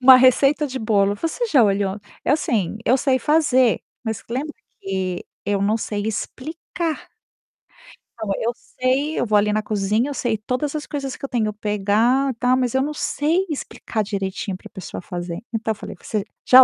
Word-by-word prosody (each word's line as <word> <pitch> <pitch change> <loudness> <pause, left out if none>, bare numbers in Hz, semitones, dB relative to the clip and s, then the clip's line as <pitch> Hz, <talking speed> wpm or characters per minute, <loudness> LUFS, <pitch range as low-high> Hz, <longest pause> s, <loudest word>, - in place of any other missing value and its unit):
Uma 255 0 +10
receita 275 +4 +5
de 260 -1 -4
bolo, 205 -3 +2
você 330 - -2
já 275 - +5
olhou 195 0 +1 0.2
eu 290 - +4
sim, 215 - 0
eu 255 - +5
sei 260 -1 +2
fazer, 260 -4 +3 0.2
mas 220 -1 -3
lembra 285 +5 -2 0.3
que 190 -2 -2 0.2
eu 200 0 +1
não 210 +2 +3
sei 210 -2 -3
explicar. 315 +8 -4 1.1
Então, 220 -3 -5
eu 235 - +1
sei, 265 +6 -1
eu - - +1
vou 215 -2 +4
ali 210 +1 +3
na 215 0 +1
cozinha, 210 +5 +1
eu - - -3
sei 240 -4 0
todas 255 +7 -2
as 300 - -3
coisas 275 -3 -4
que - - -6
eu - - -6
tenho 220 -4 +1
pegar, 215 +6 +2
tal, 250 +1 +4
mas 255 -1 0
eu 265 - +4
não 295 +3 -1
sei 320 +5 +1
explicar 240 -6 -3
direitinho 195 -1 -3
pra 185 - -11
pessoa 190 -2 -7
fazer. 175 0 -5
Então, 220 0 0
falei: 210 - -8
"Você 215 -2 -2 0.2
já 260 +1 +10
235 Hz, 180 wpm, -22 LUFS, 205-275 Hz, 1.1 s, Uma